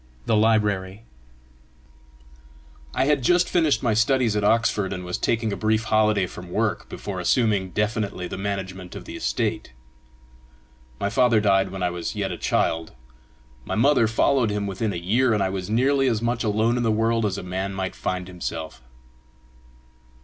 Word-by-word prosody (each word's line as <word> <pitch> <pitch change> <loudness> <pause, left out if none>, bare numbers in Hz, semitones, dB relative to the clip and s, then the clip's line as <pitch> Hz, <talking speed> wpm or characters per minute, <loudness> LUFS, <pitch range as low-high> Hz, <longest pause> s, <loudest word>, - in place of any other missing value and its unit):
THE - - +2
LIBRARY 105 -2 +1 1.9
I 130 - +2
had 145 -1 +2
just 175 +7 +3
finished 160 -6 +2
my 115 -3 +2
studies 115 0 +2
at 105 - 0
Oxford, 105 -3 +2
and 90 -1 -6
was 90 0 -3
taking 110 -2 0
a - - -2
brief 110 +1 +1
holiday 110 -3 +2
from 90 0 -10
work 110 +3 -1
before 100 -3 -6
assuming 100 0 +1
definitely 105 -2 -2
the - - -6
management 95 -2 -5
of - - -8
the 335 - -8
estate. 110 - -2 1.3
My 100 - -1
father 120 -3 +4
died 95 -2 +2
when 95 0 -5
I 90 - +1
was 90 -1 -4
yet - - -2
a - - -4
child; 80 0 0 0.7
my - - -3
mother 125 0 +4
followed 115 +2 +2
him 105 0 -2
within 100 +2 -2
a - - -5
year; 110 +8 +2
and 100 - +1
I 95 - 0
was 95 0 -4
nearly 135 +4 +2
as 115 -4 +1
much 120 +1 -1
alone 110 +2 +1
in - - 0
the 115 - +1
world 115 +1 +1
as 100 -2 -1
a - - -6
man 95 +2 -3
might 95 -1 -3
find 90 -1 -3
himself. 85 -5 -6
105 Hz, 170 wpm, -24 LUFS, 95-115 Hz, 1.9 s, father